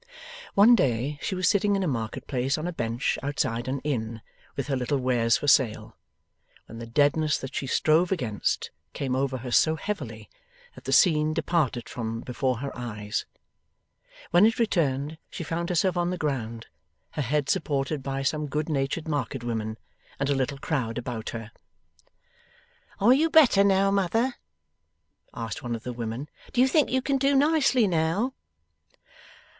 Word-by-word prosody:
One 210 +5 +7
day 135 - +1
she 190 - -2
was 185 -1 +1
sitting 205 0 +3
in 195 - 0
a - - 0
market 115 -6 -3
place 135 +1 -1
on 155 - -4
a 175 - -3
bench 115 -3 -1
outside 125 -4 -2
an 135 +1 -2
inn, 115 -6 -3 0.3
with - - -2
her 140 - -1
little 130 +3 0
wares 120 -3 +2
for 145 - -5
sale, 130 -6 +2 0.7
when 115 - -10
the 115 - -7
deadness 145 +4 +2
that 135 0 -7
she 135 - -3
strove 160 +6 +3
against 120 - -1 0.2
came 130 -2 -2
over 135 0 0
her 125 0 -7
so 160 +5 +4
heavily 210 +6 -5 0.5
that - - -14
the - - -2
scene 155 -3 +4
departed 155 -7 0
from 115 -1 -4
before 130 0 -1
her 140 - -5
eyes; 105 -3 -4 1.0
when 175 +3 +6
it 225 - 0
returned, 155 - 0
she - - -6
found 170 +2 -3
herself 180 +1 +1
on 175 0 0
the 180 - -2
ground, 115 -7 -3 0.5
her 150 - -3
head 145 +2 0
supported 145 -4 -1
by 135 0 -3
some 150 +2 -1
good 150 +2 -2
natured 140 +2 -1
market 140 -4 -2
women, 110 -2 -3 0.4
and 140 +1 0
a - - +2
little 135 +1 -1
crowd 130 -5 -2
about 120 -2 -4
her. 115 -1 -7 1.5
'Are 220 +5 +6
you 315 +5 +3
better 280 -11 +6
now, 195 0 +3
mother?' 210 +6 +1 1.0
asked 115 -2 -5
one 120 -1 -3
of 115 - -8
the 125 - -5
women. 120 +4 -5 0.3
'Do 250 - 0
you 260 - +6
think 290 +1 +3
you 260 0 0
can 275 0 +1
do 275 +1 +3
nicely 275 -4 +4
now? 180 +8 0
145 Hz, 170 wpm, -26 LUFS, 125-180 Hz, 1.5 s, One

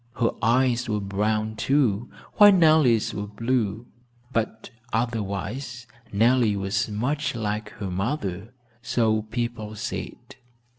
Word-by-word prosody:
Her 115 - +1
eyes 125 +1 +2
were 105 -1 0
brown, 105 +2 -1
too, 120 -2 +1 0.3
while 205 0 +9
Nellie's 155 - +4
were 105 0 -4
blue, 115 0 -1 0.5
but 110 0 -2 0.2
otherwise 115 +2 -3 0.3
Nellie 115 +1 +3
was 100 +2 -1
much 135 +7 -1
like 105 -1 -3
her 100 -3 -5
mother, 100 0 -3 0.3
so 110 -2 +1
people 110 -1 -4
said. 120 +3 -6
115 Hz, 110 wpm, -25 LUFS, 105-125 Hz, 0.5 s, while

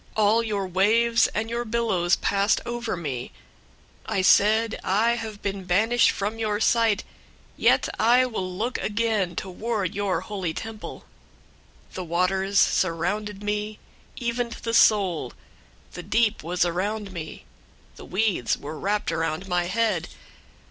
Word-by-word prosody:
All 215 +2 +4
your 210 -4 -2
waves 220 +6 +3
and 220 +1 -3
your 235 +1 -2
billows 215 -7 +1
passed 200 +1 +1
over 235 -4 -3
me. 135 -7 -5 0.8
002:004 - - -2
I 190 - +2
said, 220 +4 +4
'I 215 +5 +2
have 220 -3 -5
been 195 -1 -3
banished 220 +7 +3
from 210 +3 -3
your 210 -2 -1
sight; 225 -2 +2 0.5
yet - - +3
I 245 +3 +5
will 190 -7 -4
look 220 +7 -2
again 210 -5 0
toward 195 +1 -3
your 195 -4 -1
holy 185 -5 -4
temple.' 225 -1 -7 0.9
002:005 - - -22
The 185 - -4
waters 190 +3 0
surrounded 195 +5 +1
me, 210 +1 -2 0.4
even 240 0 -2
to - - -9
the 230 - -2
soul. 190 - +3 0.6
The 180 - -6
deep 215 +4 +1
was 175 +2 0
around 200 +4 -2
me. 160 -3 -7 0.5
The - - -11
weeds 190 - 0
were 150 +2 -7
wrapped 205 +1 -1
around 165 +3 -2
my 180 -1 0
head. 210 -2 0
205 Hz, 140 wpm, -25 LUFS, 185-225 Hz, 0.9 s, I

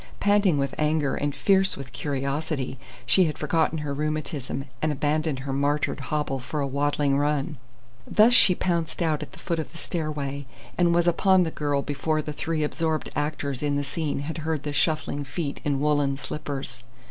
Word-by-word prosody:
Panting 205 -5 +4
with 140 0 0
anger, 150 -2 +2
and 145 0 -1
fierce 195 +6 +3
with 130 -3 -9
curiosity, 140 -1 -2 0.3
she 185 - +5
had 155 - -2
forgotten 160 +1 +1
her 150 -2 -3
rheumatism 150 -2 -3 0.2
and 155 - +2
abandoned 150 +1 0
her 135 0 -3
martyred 145 +2 0
hobble 140 0 -2
for 140 +4 -4
a 140 - +1
waddling 140 0 +1
run. 145 +1 0 0.5
Thus 220 +3 +5
she 190 -7 +6
pounced 170 -1 -1
out 155 -2 +1
at - - -8
the - - -12
foot 170 -3 -2
of 160 - -4
the 165 - -11
stairway, 145 -5 -3 0.3
and 175 -1 +3
was 175 0 +3
upon 185 +2 +4
the 160 - -2
girl 145 -2 0
before 155 +1 -1
the 150 - -4
three 160 +1 -1
absorbed 155 +1 -1
actors 145 -3 -2
in 145 -1 0
the 145 - 0
scene 145 0 -2
had 160 +3 -4
heard 155 -2 -2
the 145 - -3
shuffling 145 -1 0
feet 140 +1 -4
in 140 -2 0
woollen 145 -2 +2
slippers. 135 -5 -5
150 Hz, 180 wpm, -26 LUFS, 140-160 Hz, 0.5 s, she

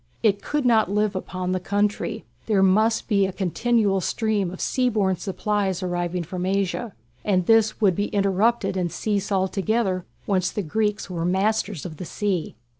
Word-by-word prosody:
It 205 -2 +3
could 295 -2 -2
not 225 -5 +4
live 210 0 +1
upon 185 -1 -3
"the 185 - 0
country"; 205 +3 -1 0.2
there 205 -3 +3
must 215 +4 +3
be 200 -3 +3
a - - -4
continual 200 +2 +1
stream 210 -1 0
of 185 - -8
sea 255 -2 +1
borne 195 -5 +1
supplies 195 0 -1
arriving 175 0 -2
from 180 +2 -5
Asia, 195 +3 -1 0.3
and 185 -4 +1
this 225 0 +3
would 195 -5 +3
be 205 +3 0
interrupted 200 +1 +1
and 180 -2 -1
cease 205 +2 -2
altogether 190 0 0 0.2
once 185 -3 +1
the 205 - -3
Greeks 210 +4 -1
were 175 -3 -4
masters 190 0 0
of 160 -4 -7
the 180 - -6
sea. 190 - -2
195 Hz, 170 wpm, -24 LUFS, 185-215 Hz, 0.3 s, not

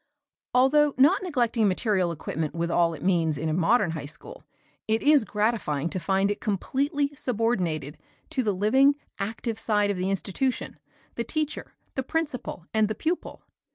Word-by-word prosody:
Although 285 +3 +4
not 295 +10 +5
neglecting 240 - +1
material 190 -2 +1
equipment 160 -1 -4
with 170 0 -1
all 170 -1 +2
it - - -10
means 165 -5 +2
in 160 +2 -2
a - - 0
modern 180 +3 +3
high 150 -3 -5
school, 160 - -10 0.4
it 220 +1 +1
is 295 -2 +5
gratifying 210 -9 -1
to 185 - -2
find 195 +2 +1
it 205 - -4
completely 280 - -1
subordinated 180 - -1 0.3
to 260 - 0
the 215 -4 +1
living, 260 +9 +4 0.2
active 225 +2 -3
side 210 -2 +1
of 200 - -3
the 185 +1 -1
institution, 200 +7 -2 0.3
the 235 - -2
teacher, 305 +4 -4 0.2
the 265 - -1
principal 265 - -3
and 220 -1 +3
the 215 - -3
pupil. 330 - -3
215 Hz, 160 wpm, -26 LUFS, 175-260 Hz, 0.4 s, not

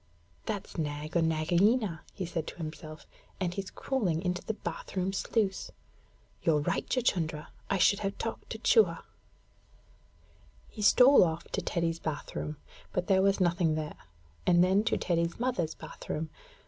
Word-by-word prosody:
'That's 205 -5 -4
Nag 150 +1 -3
or 170 - +4
Nagaina,' 170 +5 +2
he 190 - -3
said 165 -2 -3
to - - -6
himself; 155 -2 -8 0.3
'and 180 -2 -1
he's 195 0 -4
crawling 200 - -1
into 180 -1 -1
the 220 - -3
bath - - -6
room 185 +1 0
sluice. 200 0 -1 0.7
You're 155 -3 +3
right, - - -1
Chuchundra; 165 -11 0 0.2
I 195 - +2
should 200 +2 +4
have 195 -1 -3
talked - - -5
to - - -4
Chua.' 445 - +3 1.7
He 215 - -8
stole 250 +6 +7
off 165 -1 -1
to - - -2
Teddy's 165 -1 -1
bath 155 -3 -5
room, 150 0 -4 0.3
but 180 - -1
there 190 -1 +4
was 195 +1 +3
nothing 170 -3 +2
there, 155 -1 -3 0.5
and 175 -1 +6
then 190 +3 +3
to - - +2
Teddy's 170 0 0
mother's 230 -11 -1
bath - - -11
room. 155 0 -3
175 Hz, 160 wpm, -30 LUFS, 160-200 Hz, 1.7 s, stole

